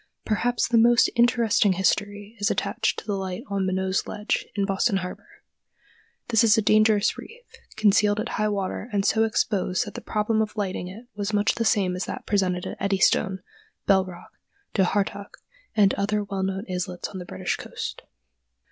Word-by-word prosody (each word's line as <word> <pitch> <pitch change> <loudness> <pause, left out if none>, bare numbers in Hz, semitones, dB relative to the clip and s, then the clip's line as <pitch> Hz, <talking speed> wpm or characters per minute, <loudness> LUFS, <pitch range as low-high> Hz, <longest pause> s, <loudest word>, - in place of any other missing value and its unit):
Perhaps 235 +3 +1
the 230 -1 +3
most 240 +1 +5
interesting 235 -4 +3
history 205 +3 -1
is 205 - +1
attached - - -1
to - - -7
the 210 - -2
light 190 +2 -4
on 195 -1 0
Minot's 190 0 -1
Ledge, 210 +1 -2
in 200 -1 +1
Boston 195 +2 +1
harbor. 180 -1 -8 0.9
This 230 -1 +4
is 220 -1 +5
a - - +4
dangerous 215 0 +3
reef, 480 +2 -12 0.3
concealed 210 -1 +3
at - - -3
high 215 - 0
water 205 +2 -3
and 200 -1 0
so 220 0 +3
exposed 205 -2 0
that 205 - -8
the - - -7
problem 215 +1 0
of 215 0 -3
lighting 190 -3 -2
it 210 +7 -10
was 205 +1 -3
much 205 +1 +2
the 230 - -2
same 195 -4 +2
as 185 - -3
that 255 - -6
presented 185 -3 0
at - - -6
Eddystone, 190 -1 +1 0.4
Bell 190 -1 +4
Rock, 185 -2 -11 0.4
Dhu 195 - +2
Heartach, 200 +1 -2 0.4
and 200 -3 +4
other 210 +1 0
well 200 -1 -4
known 190 +2 -2
islets 180 -1 -4
on 190 - -7
the - - -6
British - - -3
coast. - - -6
205 Hz, 180 wpm, -25 LUFS, 190-215 Hz, 0.9 s, most